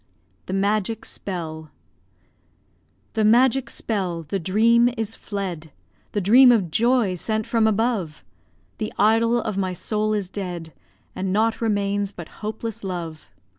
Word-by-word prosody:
THE 185 - -4
MAGIC 205 +2 0
SPELL 160 -5 -6 1.4
The 220 - +1
magic 250 +4 +4
spell, 185 -6 -2
the 175 +6 -3
dream 230 +7 +4
is 225 -1 -2
fled, 180 -6 -5 0.4
The 205 - 0
dream 245 +7 +7
of 195 -9 +2
joy 235 -1 +2
sent 215 +4 -1
from 225 -2 +2
above; 215 -7 -1 0.5
The 215 -1 -3
idol 230 +3 +3
of 215 -4 -3
my 185 -1 -1
soul 215 +4 -1
is 200 -3 -2
dead, 175 -5 -6 0.4
And 185 0 -2
naught 220 +4 +1
remains 205 -2 0
but 170 -4 -9
hopeless 220 0 -5
love. 170 -5 -5
205 Hz, 135 wpm, -23 LUFS, 185-225 Hz, 1.4 s, dream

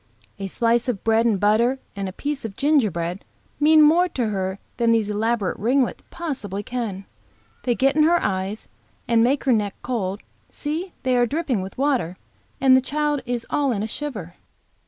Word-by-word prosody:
A 195 - -3
slice 235 +4 +1
of 235 -6 -2
bread 225 +1 +3
and 210 -4 +1
butter 225 +6 +3 0.2
and 200 -1 -3
a - - -7
piece 285 +8 -4
of 215 -3 -6
gingerbread 200 - +1 0.4
mean 310 +1 +6
more 340 +4 +5
to 245 -8 -1
her 190 -2 -2 0.2
than 235 -1 +2
these 225 -2 +2
elaborate 215 -2 -1
ringlets 250 +5 +1
possibly 230 - -4
can. 215 -5 -4 0.6
They 245 -2 +2
get 270 +3 +2
in 310 - +4
her 340 +3 +5
eyes, 195 - -2 0.4
and 230 -1 +4
make 265 +3 +2
her 260 - +3
neck 205 -3 0
cold; 205 -5 -3 0.3
see, 320 +5 -4
they 255 -1 +2
are 240 0 +3
dripping 280 - -1
with 190 +5 -8
water, 255 - 0 0.4
and 265 -1 +6
the 260 - +5
child 295 +1 -1
is 240 -1 -2
all 285 -2 +1
in 210 -3 -1
a - - -2
shiver." 215 - -5
235 Hz, 180 wpm, -23 LUFS, 205-275 Hz, 0.6 s, mean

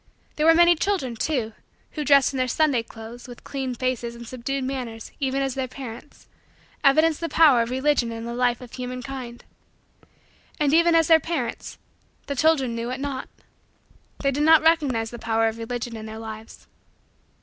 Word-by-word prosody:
There 305 +1 +1
were 325 - +7
many 345 +1 +6
children, 325 -9 -1
too, 230 -3 -2 0.4
who, 300 - -4
dressed 280 -1 +4
in - - -3
their 255 0 +1
Sunday 275 -1 +2
clothes, 230 +2 -11
with 245 -1 -12
clean 265 -3 -4
faces 240 -1 -2
and 235 0 -10
subdued 260 +3 -4
manners, 250 -4 -5
even 275 0 0
as 270 -1 -2
their 265 0 -3
parents, 255 +1 -10 0.6
evidenced 310 +3 +4
the 335 - -2
power 295 -7 +5
of 230 - -2
Religion 260 -2 +1
in 230 0 -6
the 235 - -5
life 245 0 0
of 245 -2 -12
humankind. 250 -1 -7 1.1
And, 295 -1 +2
even 335 +1 +5
as 325 -1 +5
their 325 -2 +6
parents, 290 -8 -4 0.5
the 280 - -4
children 275 -4 +2
knew 230 +1 -4
it 255 +2 -4
not. 270 -2 -4 0.9
They 275 - +2
did 280 +2 -2
not 315 0 +6
recognize 280 -9 +2
the 240 - -8
power 225 0 +1
of 225 +1 -4
Religion 240 0 -4
in 220 0 -7
their 220 0 -8
lives. 220 0 -9
255 Hz, 180 wpm, -24 LUFS, 235-290 Hz, 1.1 s, were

